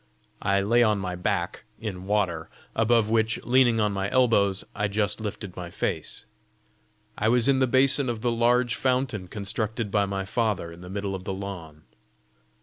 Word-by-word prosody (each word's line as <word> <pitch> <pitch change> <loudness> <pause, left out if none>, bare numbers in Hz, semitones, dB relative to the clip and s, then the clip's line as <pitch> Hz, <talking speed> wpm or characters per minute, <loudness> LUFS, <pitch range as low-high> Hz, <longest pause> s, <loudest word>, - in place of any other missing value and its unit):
I 100 -1 +2
lay 115 +5 +3
on 110 -3 +4
my 90 -2 -3
back 90 0 -2 0.2
in 95 -5 -5
water, 95 -6 0 0.3
above 115 -1 +3
which, 115 0 +2
leaning 120 -2 +4
on 105 -1 +2
my 100 0 -2
elbows, 105 -6 +3
I 105 - 0
just 105 +1 -1
lifted 100 -3 -5
my 90 -1 -6
face. - - -3 0.9
I 110 - +2
was 120 0 +4
in 135 -1 +4
the 130 - +3
basin 130 +1 +3
of 115 -2 -3
the 120 - +1
large 120 +1 +2
fountain 125 -8 0
constructed 105 +2 -3
by 100 -1 +2
my 95 0 -3
father 105 -5 -1
in 85 +1 -12
the 90 - -9
middle 100 0 -3
of 95 -1 -6
the 95 - -2
lawn. 85 -6 -7
105 Hz, 175 wpm, -26 LUFS, 95-120 Hz, 0.9 s, on